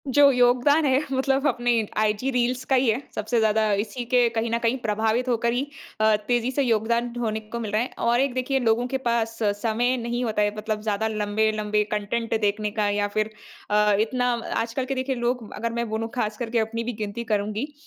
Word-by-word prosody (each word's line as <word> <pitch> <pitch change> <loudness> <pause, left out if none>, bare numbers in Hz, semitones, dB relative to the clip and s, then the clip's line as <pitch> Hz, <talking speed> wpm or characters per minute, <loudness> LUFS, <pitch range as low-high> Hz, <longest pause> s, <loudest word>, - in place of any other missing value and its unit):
जो 280 +2 +6
योगदान 250 +5 +4
है 265 0 +3
मतलब 270 +1 +1
अपने 245 -2 +1 0.3
आईजी 215 +4 +1
रील्स 250 0 0
का 265 - +2
ही 255 0 +3
है। 225 +4 +1
सबसे 220 +3 0
ज़्यादा 215 -1 +2
इसी 240 +2 -6
के 245 -1 +5
कहीं 225 +1 0
न 230 - +2
कहीं 235 +2 +1
प्रभावित 220 +3 0
होकर 235 0 +1
ही 245 - 0 0.4
अ, 215 0 +5
तेज़ी 245 0 +1
से 280 +2 +1
योगदान 235 0 +1
होने 220 -2 -1
को 220 +2 -7
मिल 220 -3 -4
रहा 215 +2 +2
है 245 - -2 0.2
और 240 +1 +3
एक 270 -1 +1
देखिए, 255 +2 0
लोगों 240 0 +1
के 265 +1 -1
पास 235 -3 -1 0.2
समय 240 +3 +1
नहीं 240 +1 -2
होता 220 -3 0
है 205 0 +1
मतलब 215 0 -3
ज़्यादा 215 0 -1
लंबे-लंबे 215 0 0
कंटेंट 220 +2 -1
देखने 210 0 0
का 210 -1 0
या 205 0 0
फिर 215 +1 -1 0.4
अ, 210 0 +3
इतना 245 +3 +1 0.3
आजकल 235 +3 -3
के 270 +1 -3
देखिए, 260 +1 -1
लोग 240 -2 -2
अगर 230 +1 -3
मैं 235 -1 -2
बोलूँ 220 +1 -2
ख़ासकर 225 0 -2
के 235 0 +1
अपनी 225 +1 -2
भी 245 +1 -3
गिनती 210 +1 -4
करूँगी। 215 +5 -2
230 Hz, 210 wpm, -24 LUFS, 215-245 Hz, 0.4 s, जो